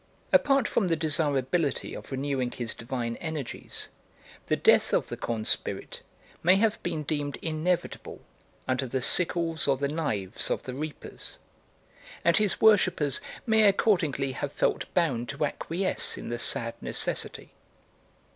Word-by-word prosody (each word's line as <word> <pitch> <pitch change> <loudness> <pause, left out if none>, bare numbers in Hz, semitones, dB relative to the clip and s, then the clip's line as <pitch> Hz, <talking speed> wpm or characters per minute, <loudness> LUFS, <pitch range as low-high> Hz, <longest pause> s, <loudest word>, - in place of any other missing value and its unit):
Apart 275 -4 +4
from 200 - +1
the 165 - +2
desirability 150 -1 0
of - - -9
renewing 135 -2 -1
his 120 -3 -3
divine 115 -1 -4
energies, 155 -6 -4 0.6
the - - +2
death - - +4
of - - +1
the - - -3
corn 110 -2 -3
spirit - - -1 0.4
may 180 +3 +6
have 215 +2 +2
been 160 -3 -2
deemed 145 -1 -2
inevitable 165 +2 -2 0.5
under 130 +1 0
the 130 +2 -1
sickles 170 -3 +2
or 135 -1 +3
the 140 +1 0
knives 115 - -1
of - - -1
the 130 - -6
reapers, 150 +3 -6 0.9
and 170 - +5
his 210 -3 +2
worshippers 185 -10 +4 0.2
may 220 -1 +4
accordingly 165 - +2
have 140 +2 -4
felt - - 0
bound 130 -9 +1
to 150 - -1
acquiesce 175 +6 -1
in - - -7
the 120 0 -3
sad 115 -2 +1
necessity. - - -1
150 Hz, 140 wpm, -28 LUFS, 130-175 Hz, 0.9 s, may